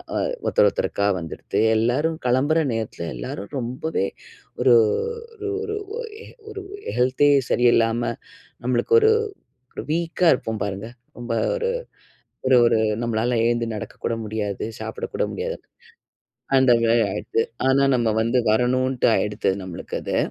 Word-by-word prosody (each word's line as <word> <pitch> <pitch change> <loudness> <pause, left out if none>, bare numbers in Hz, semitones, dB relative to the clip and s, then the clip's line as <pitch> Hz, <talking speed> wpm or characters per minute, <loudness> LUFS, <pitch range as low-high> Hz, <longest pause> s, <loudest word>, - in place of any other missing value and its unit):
வ - - +1 0.3
ஒருத்தர் - - +4
ஒருத்தருக்கா 100 0 0
வந்துடுத்து. 80 -1 -4 0.2
எல்லாரும் 145 +8 +1
கிளம்புற 140 +6 +3
நேரத்தில 110 -7 -4
எல்லாரும் 75 +11 -6
ரொம்பவே 125 -1 -2 0.6
ஒரு 125 - +6 0.7
ஒரு 410 0 -3
ஒரு 425 0 -3 0.7
ஒரு 400 -2 -7 0.3
ஹெல்த்தே 130 +3 +3 0.2
சரியில்லாம, 120 -1 +3 0.6
நம்மளுக்கு 125 - 0
ஒரு 440 0 +5 0.6
ஒரு - - -6
வீக்கா 170 +2 0
இருப்போம் 110 -2 -3
பாருங்க, 100 +2 -5 0.3
ரொம்ப 120 -1 -3 0.2
ஒரு 475 0 -1 0.8
ஒரு 130 -1 +5
ஒரு 115 -1 +3 0.2
நம்மளால 115 +1 0
எழுந்து 120 0 +1
நடக்க 105 - -6
கூட 115 - 0
முடியாது, 105 -2 -3 0.2
சாப்பிட - - -4
கூட - - +1
முடியாது, - - -3 1.0
அந்த 130 -2 +5
மாரி 115 0 +4
ஆயிடுத்து. 110 +2 -1 0.3
ஆனால் 135 0 +4
நம்ம 115 -2 +1
வந்து 120 +2 +1
வரணுன்ட்டு 130 +3 +2
ஆயிடுத்து, 105 -1 0
நம்மளுக்கு 90 -2 -6
அது. - - -2
120 Hz, 125 wpm, -23 LUFS, 110-135 Hz, 1.0 s, ஒரு